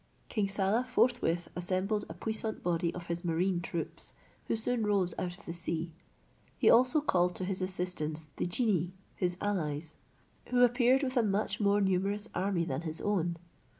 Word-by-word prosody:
King 210 -4 0
Saleh 200 +5 +1
forthwith 235 -9 +2
assembled 185 +4 -1
a 160 - -7
puissant 220 +3 -2
body 170 -1 +1
of 175 -1 -6
his 170 +1 -2
marine 175 +1 +1
troops, 170 -1 -5 0.3
who - - +1
soon 225 +1 0
rose 200 -4 +2
out 175 -1 -3
of 205 - -17
the 170 - -4
sea. 170 0 -3 0.7
He - - +5
also 255 +6 +5
called 180 -10 +2
to 185 - -2
his 190 0 -2
assistance 175 -4 -2
the - - 0
genii 180 -3 +1 0.2
his 175 -1 -1
allies, 160 -6 -2 0.5
who 250 0 +4
appeared 250 +3 +3
with 260 -1 -1
a - - +6
much 210 -1 0
more 205 -1 +3
numerous 195 +2 +1
army 185 -3 0
than 140 -2 -2
his 160 -1 -4
own. 175 -5 0
185 Hz, 170 wpm, -31 LUFS, 170-215 Hz, 0.7 s, a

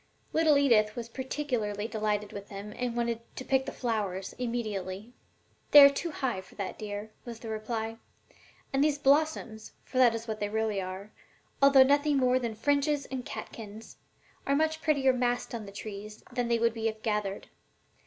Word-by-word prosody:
Little 315 -2 +4
Edith 220 -7 +4
was 235 -1 -5
particularly 245 -6 -2
delighted 210 -2 -2
with 200 0 -8
them, 205 +1 -7
and 245 -1 -3
wanted 235 -1 -1
to 260 - -6
"pick 265 0 +1
the - - -2
flowers" 205 -6 -2
immediately. 215 -3 -3 0.6
"They 290 -1 +11
are 280 - +7
too 330 +5 -3
high 260 -10 -2
for 190 - -18
that, 200 -2 -5
dear," 210 0 -5
was 235 -2 -7
the 225 0 -8
reply, 220 +1 -3 0.7
"and 270 +1 +3
these 300 -1 +2
blossoms 280 -6 +1
for 255 - -3
that 240 -3 +6
is 230 +1 -6
what 215 -1 -3
they 205 - -1
really 215 -2 0
are, 190 +3 -7 0.5
although 275 -1 +8
nothing 285 +2 +3
more 255 -1 +3
than 235 -3 -3
fringes 285 +3 +1
and 260 -2 -3
catkins 220 -1 -9 0.5
are 275 - +3
much 315 +1 +1
prettier 275 -4 +3
massed 245 -1 -1
on 220 -3 -5
the - - -8
trees 210 +1 -8
than 245 -1 -1
they 235 0 +2
would 230 0 +2
be 225 -1 -1
if 220 -1 -4
gathered. 210 -3 -2
230 Hz, 180 wpm, -29 LUFS, 210-265 Hz, 0.7 s, They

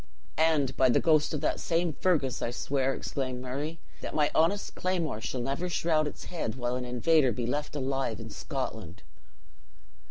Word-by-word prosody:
"And 155 -5 +3
by 130 - +4
the 120 - +4
ghost 155 -2 +3
of 150 - -2
that 155 - 0
same 170 -1 +1
Fergus, 145 -6 +1
I - - 0
swear," 135 +2 0
exclaimed 130 -2 -3
Murray, 140 +6 -4 0.2
"that - - -5
my 150 -1 +3
honest 170 +6 +2
claymore 170 -11 -1
shall 125 +1 -3
never 140 +8 -2
shroud 160 -3 +2
its - - -7
head 155 -11 -3
while 125 -1 -1
an 125 0 -3
invader 130 +3 +3
be 120 +2 -2
left 145 +5 -2
alive 135 -2 -1
in 115 -1 -8
Scotland." 110 - -5
140 Hz, 170 wpm, -29 LUFS, 125-160 Hz, 0.2 s, by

